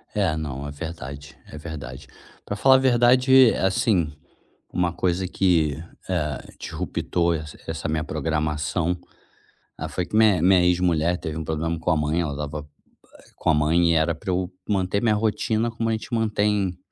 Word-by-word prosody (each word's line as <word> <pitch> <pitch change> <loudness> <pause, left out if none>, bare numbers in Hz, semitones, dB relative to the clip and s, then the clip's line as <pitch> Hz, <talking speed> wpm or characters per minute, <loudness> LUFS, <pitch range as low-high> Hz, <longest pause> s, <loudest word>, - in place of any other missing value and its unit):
É, 95 -7 +1
não, 70 -2 -5
é 70 - -6
verdade, 70 -2 -8
é 75 - -10
verdade. 75 -5 -8 0.4
Pra 100 - -3
falar 130 +6 +5
a - - +7
verdade, 130 0 +5
assim, 95 -4 +1 0.6
uma 90 -2 0
coisa 90 +1 -1
que, 85 -6 +1 0.3
eh, 75 -7 -3
disruptou 85 -1 -1
esse 75 -1 -7
essa - - -4
minha 80 0 -1
programação, 80 +3 -1 0.8
ah, - - -4
foi 90 - -3
que - - -6
mi 110 -6 +5
minha 90 +1 +5
ex-mulher 90 -1 +2
teve 80 -3 -5
um 80 - -3
problema 80 +1 -2
com 90 - 0
a 80 - +2
mãe, 75 +2 0
ela 80 -4 -2
estava 75 +1 -5 0.7
com - - -2
a - - +5
mãe 80 +3 +3
e - - +3
era 80 +1 +2
pra 85 +4 -4
eu 90 +1 -1 0.2
manter 100 0 0
minha 110 -3 +3
rotina 110 +2 0
como 115 0 -2
a - - +1
gente 110 +1 -4
mantém 105 -4 +1
85 Hz, 170 wpm, -24 LUFS, 75-100 Hz, 0.8 s, a